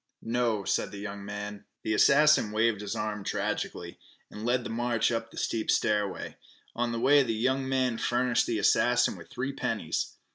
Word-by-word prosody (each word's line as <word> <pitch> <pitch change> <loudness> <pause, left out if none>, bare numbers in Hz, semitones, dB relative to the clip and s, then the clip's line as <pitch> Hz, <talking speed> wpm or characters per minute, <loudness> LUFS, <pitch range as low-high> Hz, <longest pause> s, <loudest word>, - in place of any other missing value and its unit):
"No," 115 -3 0
said - - 0
the 100 - -9
young 100 0 -6
man. 105 0 -6 0.2
The 110 - 0
assassin 145 -1 +5
waved 110 -1 +1
his 105 - -4
arm 105 -1 -3
tragically, 85 -2 -3 0.3
and 105 - -8
led 125 +1 +1
the - - -5
march 120 -1 0
up 115 -1 -2
the - - -15
steep 110 -1 -2
stairway. 105 -2 0 0.4
On 120 0 -1
the 115 - -2
way 145 +4 +5
the 115 -4 -1
young 130 +4 0
man 130 -3 0
furnished 120 0 +1
the 115 - 0
assassin 120 +4 +3
with - - -13
three 135 +3 -4
pennies. - - -2
115 Hz, 180 wpm, -28 LUFS, 105-125 Hz, 0.4 s, assassin